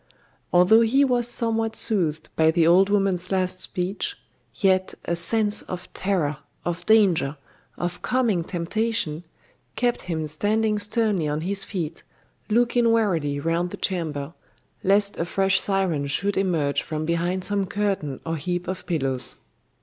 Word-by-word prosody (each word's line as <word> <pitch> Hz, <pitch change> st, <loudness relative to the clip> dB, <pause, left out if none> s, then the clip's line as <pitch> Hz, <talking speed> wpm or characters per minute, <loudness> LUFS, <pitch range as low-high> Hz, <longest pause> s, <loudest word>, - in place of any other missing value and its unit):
Although 180 Hz, +6 st, +6 dB
he 265 Hz, +5 st, +4 dB
was 245 Hz, -2 st, +1 dB
somewhat 225 Hz, -2 st, -1 dB
soothed 160 Hz, -8 st, 0 dB
by 160 Hz, 0 st, +4 dB
the 165 Hz, 0 st, +3 dB
old 185 Hz, +4 st, +5 dB
woman's 195 Hz, -3 st, +1 dB
last 185 Hz, -1 st, 0 dB
speech, 195 Hz, -, -3 dB, 0.4 s
yet 190 Hz, -3 st, +1 dB
a 170 Hz, -, 0 dB
sense 210 Hz, +5 st, +2 dB
of 180 Hz, 0 st, -8 dB
terror, 175 Hz, -7 st, -1 dB, 0.3 s
of 175 Hz, 0 st, -3 dB
danger, 185 Hz, -10 st, +3 dB, 0.4 s
of 175 Hz, 0 st, -4 dB
coming 235 Hz, -9 st, +1 dB
temptation, 175 Hz, -2 st, -1 dB, 0.5 s
kept 245 Hz, -1 st, 0 dB
him 160 Hz, -3 st, -3 dB
standing 210 Hz, +7 st, 0 dB
sternly 205 Hz, -5 st, +1 dB
on 150 Hz, +1 st, -2 dB
his 195 Hz, +3 st, -1 dB
feet, 170 Hz, -7 st, -5 dB, 0.5 s
looking 235 Hz, +1 st, +3 dB
warily 170 Hz, -11 st, +1 dB
round 165 Hz, +4 st, 0 dB
the -, -, -7 dB
chamber, 160 Hz, -5 st, -3 dB, 0.5 s
lest 200 Hz, +1 st, +2 dB
a 165 Hz, -, -1 dB
fresh 195 Hz, +2 st, +2 dB
siren 185 Hz, -8 st, 0 dB
should 195 Hz, +8 st, 0 dB
emerge 165 Hz, -7 st, +1 dB
from 155 Hz, -1 st, -4 dB
behind 175 Hz, +3 st, -1 dB
some 200 Hz, -1 st, 0 dB
curtain 195 Hz, -9 st, -2 dB
or 165 Hz, 0 st, -2 dB
heap 175 Hz, +4 st, -3 dB
of 185 Hz, 0 st, -5 dB
pillows. 135 Hz, -7 st, -2 dB
185 Hz, 140 wpm, -24 LUFS, 165-210 Hz, 0.5 s, Although